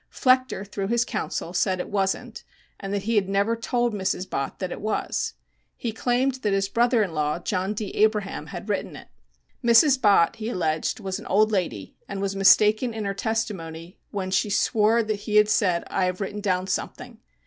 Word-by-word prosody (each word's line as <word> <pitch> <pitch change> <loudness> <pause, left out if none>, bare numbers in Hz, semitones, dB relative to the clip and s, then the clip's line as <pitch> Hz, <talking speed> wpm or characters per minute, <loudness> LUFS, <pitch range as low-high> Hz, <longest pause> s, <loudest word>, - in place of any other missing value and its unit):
Flechter 255 -6 +2
through 195 -1 -4
his 235 +2 +1
counsel 175 - -4
said 185 0 +1
it - - -5
wasn't, 205 +3 -2 0.4
and 195 - -6
that 200 -1 -2
he 225 +3 -1
had 200 -3 +2
never 200 +3 +1
told 240 0 -1
Mrs 190 -2 -2
Bott 135 - -3
that 185 -2 -4
it - - -6
was. 215 +1 -2 0.4
He 235 - -3
claimed 250 +3 0
that 210 -4 0
his 195 0 +1
brother 235 +1 +3
in 185 -5 -4
law, 150 0 0
John 190 +3 -2
D. 210 -1 -4
Abraham, 210 -2 0
had - - -8
written - - -2
it. - - -12 0.5
Mrs. 255 +3 +5
Bott, 200 -6 +4
he 220 +1 -4
alleged, 160 -6 -1
was 190 -3 -4
an - - -10
old 215 +2 +3
lady 175 - -2
and 200 - -4
was 195 0 -2
mistaken 210 +4 +4
in 215 -2 -3
her 200 - -1
testimony 195 -6 -4
when 190 -2 -4
she 195 +2 +1
swore 220 +2 +2
that 215 -1 -2
he 210 - -1
had 210 0 +6
said, 185 -5 +2
"I 190 - 0
have 180 0 -2
written 205 +1 -4
down 185 -2 0
something." 235 +5 -5
205 Hz, 195 wpm, -25 LUFS, 190-225 Hz, 0.5 s, had